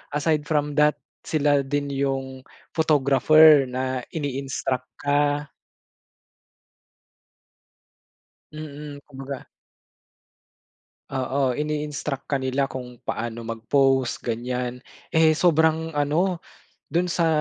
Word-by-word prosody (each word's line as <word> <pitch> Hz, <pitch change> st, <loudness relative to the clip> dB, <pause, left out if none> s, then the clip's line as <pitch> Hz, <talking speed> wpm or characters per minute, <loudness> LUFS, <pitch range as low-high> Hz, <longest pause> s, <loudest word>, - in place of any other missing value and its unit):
aside 150 Hz, 0 st, 0 dB
from 150 Hz, -1 st, 0 dB
that, 150 Hz, 0 st, +4 dB, 0.3 s
sila 145 Hz, -2 st, +2 dB
din 140 Hz, +1 st, -2 dB
yung 135 Hz, -1 st, -2 dB, 0.3 s
photographer 150 Hz, -1 st, +5 dB
na 130 Hz, 0 st, -2 dB, 0.2 s
ini-instruct 135 Hz, -3 st, -3 dB, 0.2 s
ka. 145 Hz, 0 st, +1 dB, 3.0 s
Mm, 150 Hz, -1 st, -8 dB
kumbaga 135 Hz, -1 st, -8 dB, 1.6 s
Oo, 130 Hz, -1 st, 0 dB
ini-instruct 150 Hz, -2 st, -3 dB
ka 140 Hz, -, 0 dB
nila 135 Hz, +1 st, 0 dB
kung 125 Hz, -2 st, -8 dB
paano 120 Hz, -2 st, -4 dB
mag-pose, 130 Hz, +2 st, +1 dB
ganiyan. 125 Hz, +1 st, -3 dB, 0.2 s
Eh, 160 Hz, 0 st, +4 dB
sobrang 160 Hz, -1 st, +2 dB
ano, 165 Hz, +5 st, 0 dB, 0.4 s
dun 175 Hz, +3 st, 0 dB
sa 170 Hz, -1 st, +2 dB
140 Hz, 85 wpm, -24 LUFS, 130-150 Hz, 3.0 s, photographer